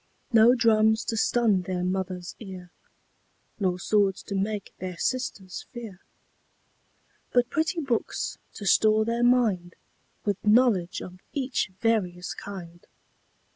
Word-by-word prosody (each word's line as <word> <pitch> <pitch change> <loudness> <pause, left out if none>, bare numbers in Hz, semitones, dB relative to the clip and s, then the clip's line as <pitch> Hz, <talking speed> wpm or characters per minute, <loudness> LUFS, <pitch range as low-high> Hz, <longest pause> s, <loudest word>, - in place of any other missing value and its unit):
No 230 +2 +7
drums 220 -2 +3
to 225 - -2
stun 220 -3 +2
their 180 0 -3
Mother's 185 -1 -3
ear, 185 -4 -9 0.9
Nor 185 -3 +1
swords 195 +1 +1
to - - -6
make 200 +1 -2
their 185 -1 -5
sisters 200 -7 -3
fear; 225 -7 -8 1.3
But 245 0 +3
pretty 320 +3 0
books 250 -6 -2 0.2
to 205 - -7
store 215 +2 +4
their 235 +1 0
mind 220 -8 +2 0.5
With 205 -2 -1
knowledge 210 -5 +3
of 180 0 -10
each 265 -6 -1
various 180 -6 0
kind. 175 -4 -9
210 Hz, 120 wpm, -26 LUFS, 185-235 Hz, 1.3 s, No